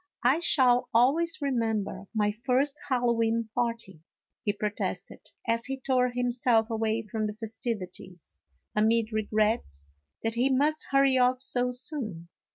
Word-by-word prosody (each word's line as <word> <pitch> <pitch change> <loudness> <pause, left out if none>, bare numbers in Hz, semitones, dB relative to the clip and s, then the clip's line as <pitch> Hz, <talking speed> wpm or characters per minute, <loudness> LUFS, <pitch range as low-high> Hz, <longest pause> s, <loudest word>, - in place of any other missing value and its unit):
" - - -30
I 260 +6 +4
shall 255 -7 +3
always 305 +8 +3
remember 225 -7 -1
my 210 -2 +1
first 260 +5 0
Hallowe'en 230 -3 +1
party," 230 -8 -3 0.4
he 205 - +1
protested, 205 0 -4 0.3
as 230 0 +1
he 270 0 -4
tore 255 -1 +1
himself 245 -2 +1
away 225 0 -1
from 215 0 -3
the 210 - -6
festivities, 205 -6 -6 0.4
amid 220 +1 +2
regrets 210 - -1 0.3
that 225 0 -1
he 245 +3 +1
must 295 +4 +1
hurry 275 -1 +4
off 250 0 +3
so 250 -1 0
soon. 245 - -1
230 Hz, 135 wpm, -28 LUFS, 215-255 Hz, 0.4 s, I